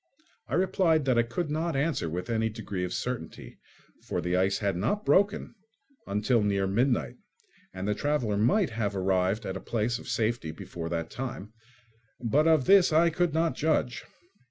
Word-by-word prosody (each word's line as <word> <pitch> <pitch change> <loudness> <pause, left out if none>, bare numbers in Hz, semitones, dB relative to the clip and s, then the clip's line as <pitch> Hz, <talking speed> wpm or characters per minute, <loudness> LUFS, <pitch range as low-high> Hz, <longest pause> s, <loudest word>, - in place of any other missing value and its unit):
I - - -2
replied 170 -4 +2
that 125 -3 +3
I - - +6
could 135 +7 -3
not 160 +1 -1
answer 140 - 0
with 90 +3 -4
any 110 -1 0
degree 105 -4 -5
of 90 - -3
certainty, 125 -9 -5 0.4
for - - -3
the 90 +1 -1
ice 95 +2 +2
had 100 -2 -1
not 205 - -1
broken 200 +2 +2 0.5
until 105 +4 +1
near 100 -1 +1
midnight, 105 - 0 0.5
and 95 +1 -5
the 105 - +2
traveller 125 -4 0
might 130 - +2
have 105 -3 -2
arrived 95 +3 0
at 95 - -4
a - - -4
place 115 +1 -1
of - - -12
safety 115 -6 -1
before 80 +1 -7
that 85 -1 -3
time; 120 -5 -6 0.7
but 140 +7 +2
of 160 -5 +4
this 195 -3 +6
I 165 +2 +4
could 170 -1 0
not 165 0 +2
judge. 150 -5 0
115 Hz, 175 wpm, -28 LUFS, 100-155 Hz, 0.7 s, I